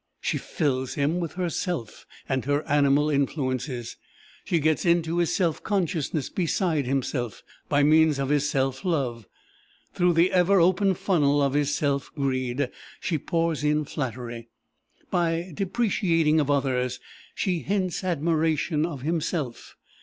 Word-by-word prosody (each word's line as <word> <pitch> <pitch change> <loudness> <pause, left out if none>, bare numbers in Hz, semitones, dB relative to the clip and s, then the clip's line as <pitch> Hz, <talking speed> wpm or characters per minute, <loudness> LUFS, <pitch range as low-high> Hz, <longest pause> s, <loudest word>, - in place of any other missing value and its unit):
She - - -1
fills 130 -6 -2
him 150 +5 +1
with 170 -3 -3
herself, 175 - -3 0.2
and 130 -1 0
her 145 +2 0
animal 145 0 +3
influences. 130 -3 -2 0.5
She 170 - +1
gets 155 +1 +1
into 170 -1 +2
his 170 - +1
self 170 -5 0
consciousness 165 - -1
beside 165 -5 0
himself, 125 -3 -2 0.3
by 145 0 +3
means 155 0 +5
of 135 -1 -2
his 145 0 +2
self 135 -1 -1
love. 130 - -1 0.7
Through 180 -1 +3
the 170 +2 +4
ever 185 +2 +4
open 185 +3 +3
funnel 145 -6 +2
of 140 -1 +2
his 145 0 +1
self 140 -2 -1
greed, 130 -2 -1 0.3
she 160 -2 -1
pours 165 0 -1
in 150 0 +1
flattery. 120 -5 -5 0.6
By 170 +1 0
depreciation 175 -5 +1
of 145 -2 0
others, 130 -3 0 0.4
she 180 -3 0
hints 190 0 -1
admiration 160 -1 +1
of 140 -7 -7
himself. 155 -5 -3
150 Hz, 135 wpm, -26 LUFS, 135-170 Hz, 0.7 s, means